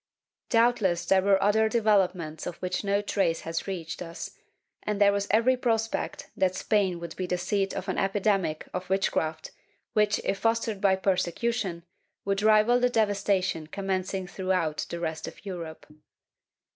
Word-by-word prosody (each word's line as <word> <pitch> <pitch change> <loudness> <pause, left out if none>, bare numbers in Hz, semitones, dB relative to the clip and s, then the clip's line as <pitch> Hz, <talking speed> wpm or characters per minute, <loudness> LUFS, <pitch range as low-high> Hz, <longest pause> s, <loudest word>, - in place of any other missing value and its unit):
^ - - -52
Doubtless 230 -7 +2
there 190 +2 +4
were 195 0 +4
other 220 +2 +3
developments 190 -8 +1
of 175 - -4
which 180 +2 -3
no 200 0 +1
trace 195 -5 0
has 165 +3 -4
reached 170 -4 -5
us, 165 -1 -6 0.5
and 210 -1 -2
there 200 -1 +6
was 200 0 -1
every 230 +5 +4
prospect 225 -3 -2
that 185 -1 +1
Spain 190 -3 +1
would 170 -1 -7
be 185 - -3
the 180 - 0
seat 195 +2 -1
of 190 - -4
an 190 - -1
epidemic 195 -5 0
of 180 0 -4
witchcraft 160 -4 -1 0.4
which, 210 -1 +3
if 195 - -1
fostered 225 -3 0
by 195 -2 +4
persecution, 190 0 -1 0.4
would 195 0 0
rival 215 +3 +5
the 250 0 +3
devastation 200 -7 +1
commencing 190 0 -2
throughout 185 -4 -1
the 170 - -4
rest 160 -2 -3
of - - -11
Europe. 170 -5 -7
195 Hz, 160 wpm, -27 LUFS, 180-210 Hz, 0.5 s, there